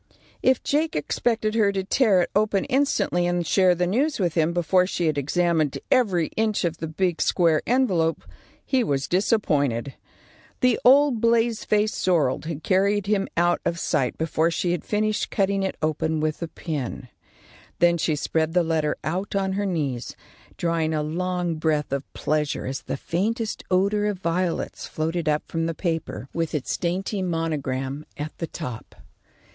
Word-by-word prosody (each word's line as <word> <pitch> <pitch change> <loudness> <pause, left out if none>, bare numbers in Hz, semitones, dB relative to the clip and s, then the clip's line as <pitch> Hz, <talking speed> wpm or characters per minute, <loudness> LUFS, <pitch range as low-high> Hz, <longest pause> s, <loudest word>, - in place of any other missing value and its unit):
If 260 -1 +3
Jake 310 +3 0
expected 220 +7 0
her 215 -3 +3
to 195 -1 -2
tear 195 -3 +3
it - - -5
open 205 -2 +2
instantly 265 -10 +1
and 175 -1 0
share 185 +2 +4
the 180 +1 +1
news 265 - 0
with 175 -4 +1
him 165 0 +2
before 180 +1 +2
she 175 -2 -1
had 155 -2 +1
examined 155 +1 +1
every 190 -11 +3
inch 215 -2 +1
of 165 -1 -2
the 160 - -4
big 175 +2 -1
square 165 -4 +3
envelope, 190 -11 +1 0.4
he 260 -2 +2
was 140 -8 -1
disappointed. 145 - +1 0.7
The 250 -2 +3
old 265 -2 +5
blaze 230 -1 +2
faced 210 0 +1
sorrel 160 -8 +1
had 160 -2 -5
carried 200 +1 +2
him 200 -1 +1
out 175 +1 +2
of 170 - -1
sight 145 -6 0
before 160 0 +1
she 175 +1 -1
had 175 - -2
finished 215 0 0
cutting 195 -1 +1
it 190 - -2
open 155 0 0
with 155 +1 -2
a 170 - -2
pin. 140 -6 -5 0.7
Then 170 0 +3
she 155 -1 +1
spread 160 +2 -1
the 180 - +4
letter 160 -2 0
out 185 +6 -3
on 195 -1 0
her 200 +1 -1
knees, 145 -9 -2 0.4
drawing 165 -2 0
a 150 - 0
long 175 +1 -2
breath 155 -2 0
of 140 0 -3
pleasure 150 -1 -1
as 135 +1 -4
the - - -4
faintest 220 - -2
odour 200 +3 +2
of 205 -2 -1
violets 180 0 -2
floated 160 +1 -2
up 150 0 +1
from 165 0 -2
the 165 - -3
paper 165 -6 -3
with 165 -1 -2
its 145 - -2
dainty 190 +3 -2
monogram 150 -5 -2
at 150 +1 -5
the 165 - -3
top. 125 -10 -7
175 Hz, 170 wpm, -24 LUFS, 155-200 Hz, 0.7 s, old